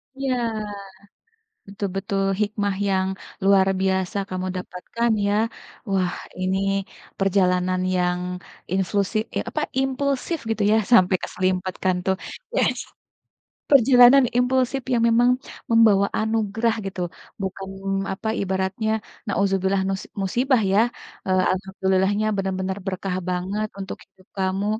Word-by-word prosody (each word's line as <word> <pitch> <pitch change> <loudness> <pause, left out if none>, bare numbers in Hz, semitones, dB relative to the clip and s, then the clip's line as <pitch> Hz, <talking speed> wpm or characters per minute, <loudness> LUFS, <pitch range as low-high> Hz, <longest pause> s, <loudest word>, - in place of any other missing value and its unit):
Iya, 270 -1 -1 1.3
betul 200 0 -4
betul, 195 0 -1 0.2
hikmah 205 -1 0
yang 190 -1 +1 0.4
luar 195 -1 +5
biasa 190 0 0
kamu 185 0 -3
dapatkan 225 +6 -2 0.2
ya. 205 - +2 0.6
Wah, 185 -2 +1 0.3
ini 190 +1 +1 0.6
perjalanan 185 -1 +2
yang 180 0 +1 0.5
inslusi 195 +2 0 0.2
eh - - 0
apa, - - -2 0.2
impulsif 275 +4 -1
gitu 220 -2 0
ya, - - +5 0.2
sampai 185 -3 +6
keserimpet 185 0 -1
kan 185 -1 +3
tuh, 190 0 +2 0.4
yes. - - +2 0.9
Perjalanan 255 0 +7
impulsif 255 +1 +1
yang 235 -1 +2
memang 240 +2 +4 0.4
membawa 215 -4 +5
anugerah 220 +1 0
gitu, 190 -1 -5 0.4
bukan 195 0 -4 0.5
apa 220 +3 -4
Ibaratnya, 190 +3 -1 0.4
naudzubillah 195 -1 +1
nus 195 0 -2 0.2
musibah 245 +5 +2
ya. 200 - +4 0.5
Eee, 185 0 +3
alhamdulillahnya 190 +2 0
benar-benar 190 0 -2
berkah 185 -1 -2
banget 190 +4 -1
untuk 195 -1 -5
hidup 185 -1 -26
kamu, 190 +2 0
195 Hz, 115 wpm, -23 LUFS, 190-220 Hz, 1.3 s, Perjalanan